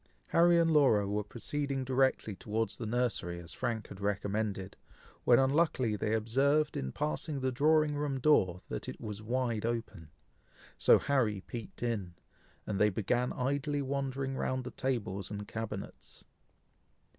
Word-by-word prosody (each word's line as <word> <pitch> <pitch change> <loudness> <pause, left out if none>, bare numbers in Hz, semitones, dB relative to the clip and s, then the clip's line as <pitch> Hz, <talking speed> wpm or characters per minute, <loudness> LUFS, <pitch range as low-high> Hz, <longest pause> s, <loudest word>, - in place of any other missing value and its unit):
Harry 170 +1 +5
and 165 -1 +4
Laura 130 -10 +4
were 105 +1 -1
proceeding 135 +5 -3
directly 130 -4 +1
towards 110 +1 -2
the 115 - -4
nursery, 110 -7 -1
as 85 -1 -10
Frank 115 -4 -3
had 100 0 -10
recommended, 100 -1 -2 0.5
when 120 - +7
unluckily 135 -4 +2
they 105 +2 0
observed 140 +7 +2
in 65 -1 -3
passing 150 - -2
the 130 0 0
drawing 150 +3 +3
room 145 -2 -1
door, 95 - +3
that - - -5
it - - -8
was 105 -1 -6
wide 120 -1 -1
open; 115 -8 -3 0.7
so - - +6
Harry 115 -8 +1
peeped 120 - -8
in, 100 -8 -2 0.5
and 100 -2 -2
they 105 - +5
began 120 +5 0
idly 140 +3 -1
wandering 135 0 -2
round 130 0 -1
the 125 - -6
tables 110 -7 -2
and 105 -1 -6
cabinets. 110 -3 -7
120 Hz, 145 wpm, -32 LUFS, 105-135 Hz, 0.7 s, when